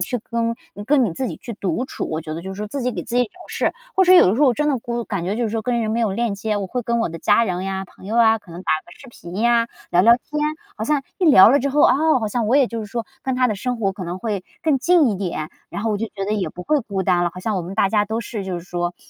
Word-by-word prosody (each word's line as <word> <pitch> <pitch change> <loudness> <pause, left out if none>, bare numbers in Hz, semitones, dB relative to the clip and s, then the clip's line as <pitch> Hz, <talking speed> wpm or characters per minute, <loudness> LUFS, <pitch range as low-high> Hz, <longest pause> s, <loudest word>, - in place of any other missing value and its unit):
去 245 +6 -1
跟， 230 0 0 0.2
嗯， 205 +2 -8
跟 270 +2 +3
你 195 - -1
自 260 - -3
己 - - -6
去 235 - -8
独 200 +3 -2
处。 - - -5
我 155 0 -2
觉 155 -1 -6
得 165 - -6
就 190 - -6
是 190 - -10
说 210 - -3
自 270 +6 -4
己 250 +1 0
给 - - -4
自 240 - -4
己 245 - +4
找 215 - -13 0.2
事， - - 0 0.2
或 380 - +4
者 365 - +6
是 - - +9
有 - - +6
的 190 - +2
时 250 - -1
候 295 - +6
我 245 - +2
真 300 +2 0
的 270 - +1
孤 235 0 -4
感 195 -6 -3
觉 190 +3 -1
就 240 - 0
是 - - 0
说， 225 0 -2
跟 240 +1 0
人 220 -1 -1
没 230 +2 0
有 220 -4 +1
链 230 0 -1
接， 210 +1 -2
我 200 - -2
会 245 +6 -3
跟 235 +1 0
我 230 - 0
的 165 0 -7
家 230 - +3
人 185 -3 -2
呀， 190 0 -3
朋 185 - -18
友 220 - -2
啊 225 -1 +5
可 205 -4 -18
能 170 - -8
打 - - +1
个 - - -15
视 265 - -14
频 175 -6 -10
呀， 235 +1 +3 0.2
聊 175 - +4
聊 230 +4 +7
天， 300 +4 -5 0.4
好 220 - -3
像 290 +3 +1 0.2
一 370 - +1
聊 275 - +8
了 280 - +5
之 280 +1 -1
后， 295 +2 +2
哦， 310 -1 +4
好 220 - -1
像 230 +1 -1
我 250 +6 +3
也 275 - +5
就 230 -1 -5
是 215 - -6
说 230 +2 -4 0.2
跟 265 - -1
他 255 0 +3
的 215 - 0
生 245 +4 -3
活 195 -3 0
可 190 -1 -7
能 175 +2 -5
会 205 -3 -3 0.2
更 305 -4 +2
近 335 0 +4
一 205 - -2
点， 170 -5 -4 0.2
然 - - -5
后 225 - 0
我 210 - 0
就 225 +3 -2
觉 195 -2 -5
得 205 - -2
也 200 -3 -1
不 180 - -9
会 300 +5 +1
孤 200 -5 -3
单 180 -2 +2
了。 175 - 0
好 180 - -7
像 210 +1 -1
我 180 - -2
们 180 +3 -7
大 200 -2 +3
家 210 +1 +2
都 220 +2 -3
是 210 -2 -5
就 185 -2 -3
是 170 - -11
说 175 -1 -3
220 Hz, 365 characters per minute, -21 LUFS, 190-245 Hz, 0.4 s, 是